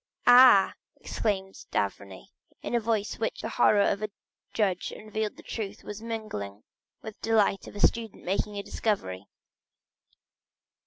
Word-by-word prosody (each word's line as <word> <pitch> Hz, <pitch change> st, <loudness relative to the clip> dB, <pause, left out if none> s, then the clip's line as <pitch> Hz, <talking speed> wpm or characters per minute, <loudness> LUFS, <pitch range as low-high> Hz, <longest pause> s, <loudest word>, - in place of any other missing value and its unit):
"Ah," 245 Hz, -5 st, +8 dB, 0.3 s
exclaimed 195 Hz, -3 st, -3 dB
d'Avrigny, 100 Hz, -1 st, -3 dB, 0.3 s
in -, -, -4 dB
a 240 Hz, -, +3 dB
voice 220 Hz, -2 st, -1 dB
in -, -, -12 dB
which 225 Hz, -, -2 dB
the 225 Hz, -, -4 dB
horror 215 Hz, -3 st, +4 dB
of 200 Hz, -, 0 dB
a 215 Hz, -, -2 dB, 0.4 s
judge 190 Hz, -5 st, 0 dB
unveiling 215 Hz, 0 st, -4 dB
the -, -, -14 dB
truth 210 Hz, -2 st, -6 dB
was 210 Hz, +1 st, -7 dB
mingled 215 Hz, -, -6 dB, 0.4 s
with 220 Hz, -1 st, -9 dB
the -, -, -4 dB
delight 210 Hz, -3 st, +2 dB
of -, -, -11 dB
a -, -, -6 dB
student 225 Hz, -1 st, +1 dB
making 200 Hz, +3 st, -1 dB
a 200 Hz, -, -3 dB
discovery. 100 Hz, -, -2 dB
210 Hz, 150 wpm, -28 LUFS, 190-225 Hz, 0.4 s, Ah